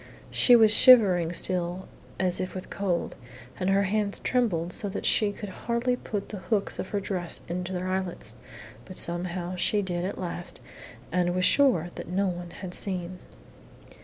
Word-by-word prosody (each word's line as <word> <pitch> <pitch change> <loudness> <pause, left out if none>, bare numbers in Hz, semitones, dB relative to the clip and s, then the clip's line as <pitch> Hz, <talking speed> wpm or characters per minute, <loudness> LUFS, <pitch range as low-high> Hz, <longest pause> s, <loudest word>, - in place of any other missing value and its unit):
She 245 - +6
was 220 -2 +6
shivering 190 -10 +6
still 180 +1 0 0.3
as 185 -1 +1
if 185 - -4
with 185 - -7
cold, 185 -4 -2 0.4
and 185 0 0
her 195 +1 +3
hands 200 +1 0
trembled 180 -9 0
so 205 - -1
that 195 - -5
she 210 -2 +2
could 205 0 -8
hardly 235 +5 -1
put 205 -4 -5
the 205 - -6
hooks 200 +1 -1
of 190 - -4
her 205 - -1
dress 185 -3 -4
into 180 +1 -4
their 185 0 -3
eyelets. 185 -1 -4 0.5
But 185 - -11
somehow 175 +1 0
she 205 +3 +1
did 175 -2 -3
at 195 +3 -4
last, 175 0 -6 0.5
and 180 -1 0
was 185 0 +2
sure 215 - +3
that - - -8
no 190 +3 0
one 175 -2 -4
had 180 +1 -8
seen. 180 -2 -3
185 Hz, 170 wpm, -27 LUFS, 175-205 Hz, 0.5 s, She